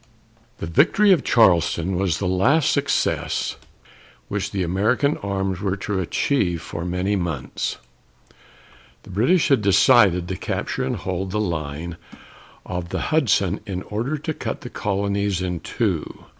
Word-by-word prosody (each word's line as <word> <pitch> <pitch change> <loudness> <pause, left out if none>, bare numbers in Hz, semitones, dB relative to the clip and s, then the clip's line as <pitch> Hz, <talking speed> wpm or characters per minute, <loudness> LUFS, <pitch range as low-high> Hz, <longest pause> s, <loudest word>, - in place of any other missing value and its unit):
The - - -5
victory 180 - +4
at 170 - +1
Charleston 90 -4 +3
was 90 -3 0
the 95 - -2
last 125 - +3
success - - 0 0.7
which 100 -2 -2
American 100 - +1
arms 95 -2 -2
were 100 -2 -1
to 100 0 -2
achieve 90 - 0
for 85 - -6
many 90 +3 -1
months. 85 -8 -3 1.3
The - - -12
British 125 - +2
had 135 -5 +4
decided 100 -3 +5
to 95 - -3
capture - - -3
and - - -1
hold 95 +1 -3
the 105 +3 -2
line 85 -3 -3 0.7
of 90 -1 -4
the - - -3
Hudson 100 - +2
in 95 -2 -4
order 120 +9 -3
to 155 +2 -4
cut - - -5
the - - -8
colonies 100 -1 -1
in 90 -2 -2
two. - - -3
95 Hz, 140 wpm, -22 LUFS, 90-105 Hz, 1.3 s, decided